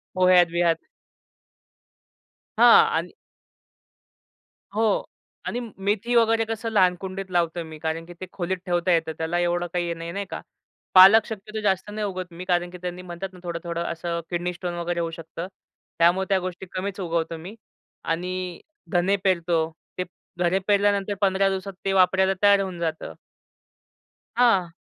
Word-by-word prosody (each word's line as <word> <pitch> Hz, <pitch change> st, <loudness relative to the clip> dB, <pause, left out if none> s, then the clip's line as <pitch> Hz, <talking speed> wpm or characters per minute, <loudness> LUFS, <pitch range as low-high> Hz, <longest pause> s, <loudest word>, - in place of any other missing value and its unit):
पोह्यात-बिह्यात. 175 Hz, -2 st, +3 dB, 1.7 s
हां, 450 Hz, 0 st, +8 dB
आणि -, -, -1 dB, 1.7 s
हो 220 Hz, -1 st, +2 dB, 0.4 s
आणि 245 Hz, -, -2 dB, 0.2 s
मेथी 215 Hz, +4 st, 0 dB
वगैरे 225 Hz, -1 st, +4 dB
कसं 225 Hz, 0 st, -4 dB
लहान 185 Hz, -4 st, +4 dB
कुंडीत 190 Hz, 0 st, -6 dB
लावतो 170 Hz, -1 st, 0 dB
मी 160 Hz, -1 st, -10 dB
कारण 160 Hz, +1 st, -3 dB
की 175 Hz, -, -11 dB
ते 185 Hz, -, -5 dB
खोलीत 185 Hz, 0 st, -2 dB
ठेवता 175 Hz, 0 st, +1 dB
येतं. 165 Hz, -1 st, +1 dB
त्याला 165 Hz, +2 st, -1 dB
एवढं 175 Hz, 0 st, 0 dB
काही 175 Hz, -1 st, -1 dB
नाही, 165 Hz, 0 st, -6 dB
नाही 200 Hz, +1 st, -4 dB
का. -, -, -5 dB, 0.5 s
पालक 195 Hz, +4 st, +9 dB
शक्यतो 215 Hz, 0 st, -6 dB
जास्त 195 Hz, -1 st, 0 dB
नाही 210 Hz, 0 st, -3 dB
उगवत 185 Hz, -2 st, -5 dB
मी 180 Hz, +2 st, -8 dB
कारण 175 Hz, -1 st, +1 dB
की 180 Hz, -, -9 dB
त्यांनी 180 Hz, 0 st, -5 dB
म्हणतात 180 Hz, +1 st, -6 dB
ना, 180 Hz, -, -13 dB
थोडं-थोडं 170 Hz, 0 st, -4 dB
असं 170 Hz, 0 st, -3 dB
किडनी 175 Hz, +1 st, -2 dB
स्टोन 175 Hz, 0 st, -5 dB
वगैरे 175 Hz, 0 st, -2 dB
होऊ 165 Hz, -1 st, -2 dB
शकतं. 165 Hz, +1 st, -7 dB, 0.5 s
त्यामुळे 175 Hz, +3 st, +4 dB
त्या 195 Hz, -, +3 dB
गोष्टी 185 Hz, 0 st, -6 dB
कमीच 195 Hz, +2 st, -4 dB
उगवतो 165 Hz, -2 st, -2 dB
मी 185 Hz, +7 st, -9 dB, 0.5 s
आणि 180 Hz, +1 st, -3 dB, 0.3 s
धने 180 Hz, +3 st, +3 dB
पेरतो. 170 Hz, -3 st, +1 dB, 0.3 s
ते 180 Hz, -, 0 dB, 0.4 s
धने 180 Hz, +2 st, +2 dB
पेरल्यानंतर 205 Hz, 0 st, +2 dB
15 195 Hz, 0 st, +3 dB
दिवसात 195 Hz, 0 st, -4 dB
ते 195 Hz, -, +1 dB
वापरायला 190 Hz, +1 st, +4 dB
तयार 200 Hz, -1 st, +6 dB
होऊन 185 Hz, -3 st, -5 dB
जातं. 160 Hz, -2 st, -3 dB, 1.2 s
हां. 195 Hz, -9 st, +3 dB
180 Hz, 150 wpm, -24 LUFS, 170-195 Hz, 1.7 s, पालक